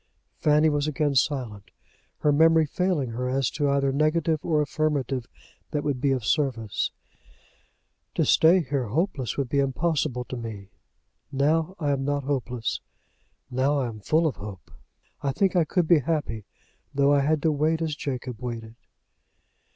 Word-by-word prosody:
Fanny 150 +1 +4
was 145 -1 +1
again 150 -1 0
silent, 125 -7 -1 0.5
her 150 - +3
memory 160 +2 +5
failing 155 -5 -1
her 125 +2 -3
as 135 -1 0
to 145 -2 0
either 140 -1 +2
negative 155 +2 +1
or 155 -3 +1
affirmative 140 -4 -1 0.4
that 145 -1 -2
would 140 -4 -2
be 140 - +2
of 130 -5 -1
service. 115 -2 0 1.3
"To - - +2
stay 175 +3 +5
here 140 -5 -2
hopeless 140 - -1
would 140 -2 0
be 140 +3 0
impossible 140 -1 0
to 125 - -6
me. 110 -5 -7 0.6
Now 155 +6 +1
I 150 -5 0
am 135 -1 0
not 145 0 -1
hopeless. 125 -4 -2 0.7
Now 135 +3 +1
I 130 -3 0
am 110 -2 -9
full 155 +10 +2
of 155 - -1
hope. 100 -3 -9 0.5
I 140 - 0
think 190 +6 +1
I 170 -3 +4
could 175 +1 0
be 170 -2 +6
happy, 135 -8 -2 0.5
though 140 +1 +3
I 145 - +4
had 150 +3 +2
to 160 - +3
wait 155 +2 +1
as 160 -2 -2
Jacob 130 -5 -5
waited." 115 -2 -5
140 Hz, 160 wpm, -26 LUFS, 125-155 Hz, 1.3 s, be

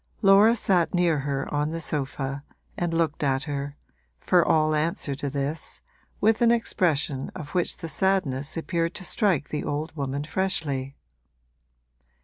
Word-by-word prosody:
Laura 200 +4 +7
sat 185 -6 +2
near 170 -4 +2
her 140 0 -2
on 150 +1 +1
her 165 - -3
sofa 140 -2 -3 0.3
and 175 -1 -1
looked 165 -2 0
at 135 -1 +1
her, 145 -1 -4 0.4
for 175 - +3
all 155 0 +3
answer 155 -2 0
to 140 +1 -3
this, 145 +3 -4 0.4
with 220 +2 +3
an 235 - +5
expression 160 - +1
of 150 - -7
which 180 0 0
the 165 - -6
sadness 160 -6 0
appeared 165 +1 -1
to - - -5
strike 185 - +1
the 150 - -3
old 155 +2 -3
woman 140 -1 -3
freshly. 150 -6 -2
155 Hz, 145 wpm, -26 LUFS, 140-175 Hz, 0.4 s, Laura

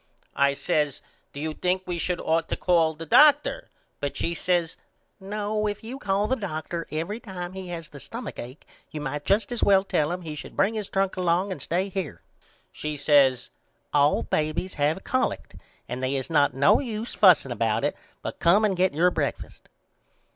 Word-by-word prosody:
I 140 0 +3
says 145 0 -1 0.3
Do 140 - -8
you 155 +1 -3
think 185 +3 -1
we 175 -1 -3
should 180 +1 -1
ought 165 0 0
to - - -1
call 165 -3 +2
the 165 +2 -7
doctor 300 - +5 0.3
but 145 - -3
she 170 - -1
says 175 -1 0 0.4
No 210 +2 -2
if 205 +1 -4
you 250 +4 -7
call 200 -1 0
the 260 - +1
doctor 170 -5 -5
every 165 +8 -3
time 185 -6 -7
he 190 -1 -7
has 170 -2 -6
the 140 - -11
stumach 205 - -7
acke 125 +5 -9 0.3
you 155 - -6
might 145 0 -4
just 200 +6 +1
as 240 - -2
well 195 -1 +5
tell 155 -5 0
him 180 0 -4
he 155 -2 -5
should 150 - -9
bring 200 +3 +3
his 215 -3 -4
trunk 195 -1 0
along 180 +2 +1
and 185 - -5
stay 180 +4 -1
here. 165 - -5 0.5
She 150 0 -5
says 140 -4 +3 0.4
All 145 0 +3
babys 155 +4 -1
have 150 +6 0
collect 255 - -1 0.3
and 125 +1 -5
they 130 +1 0
is 135 +4 -3
not 145 -4 +3
no 140 +1 +5
use 230 -3 -4
fusing - - +5
about - - 0
it - - -1 0.3
but - - -5
come 195 +6 +4
and 200 -3 +1
get 180 -3 +1
your 180 +3 +4
breakfast. - - -4
175 Hz, 190 wpm, -25 LUFS, 150-200 Hz, 0.5 s, doctor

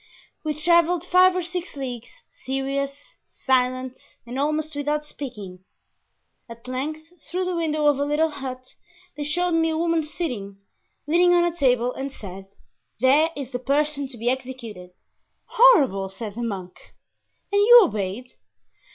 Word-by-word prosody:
We 305 -1 -2
traveled 340 +2 +2
five 365 0 +5
or 365 - -1
six 355 0 -6
leagues, 250 -4 -6 0.2
serious, 275 - -4
silent, 255 0 0 0.3
and 245 +3 -5
almost 305 +2 -1
without 295 +1 -1
speaking. 205 -11 -8 0.9
At 230 +1 -11
length, 310 +6 -6
through 365 +1 -1
the 365 -1 -2
window 310 -2 0
of 290 -2 +4
a - - +1
little 300 +2 +1
hut, 255 -2 -7 0.4
they 295 - -4
showed 350 +5 0
me 325 -1 +2
a 315 - -1
woman 335 0 +1
sitting, 250 - -5 0.5
leaning 350 +3 +4
on 345 - +4
a 345 -1 0
table, 250 -5 +2
and 275 +1 -5
said, 195 -5 -10 0.5
'there 280 +6 +4
is 270 -3 -6
the 245 - -3
person 285 +2 0
to 260 -2 -13
be 230 +2 -5
executed.'" 245 -7 -4 0.6
"Horrible!" 275 - +4
said 200 +2 -7
the 235 - -6
monk. 195 -6 -7 0.6
"And 405 0 +3
you 480 +3 +9
obeyed?" 215 - -3
280 Hz, 150 wpm, -24 LUFS, 250-325 Hz, 0.9 s, you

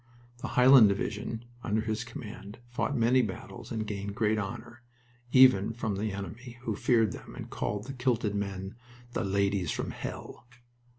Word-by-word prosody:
The 130 - -4
Highland 125 -3 +8
division, 110 +3 -3 0.2
under 110 -1 +1
his 110 +1 -2
command, 105 -3 -9
fought 140 +2 -1
many 120 +3 +4
battles 105 -6 -6
and 110 -1 -2
gained 100 -1 -4
great 110 -2 +2
honor, 120 +3 -6 0.5
even 125 -6 +6
from 110 -3 -2
the 105 +1 -1
enemy, 110 +6 -7
who 110 -4 -1
feared 115 +1 +3
them - - -9
and - - -8
called 105 0 -2
the 135 - -6
kilted 120 -5 0
men 100 -1 -3 0.4
"the - - -1
ladies 100 -1 +1
from - - -2
hell." - - -7
110 Hz, 160 wpm, -29 LUFS, 100-120 Hz, 0.5 s, Highland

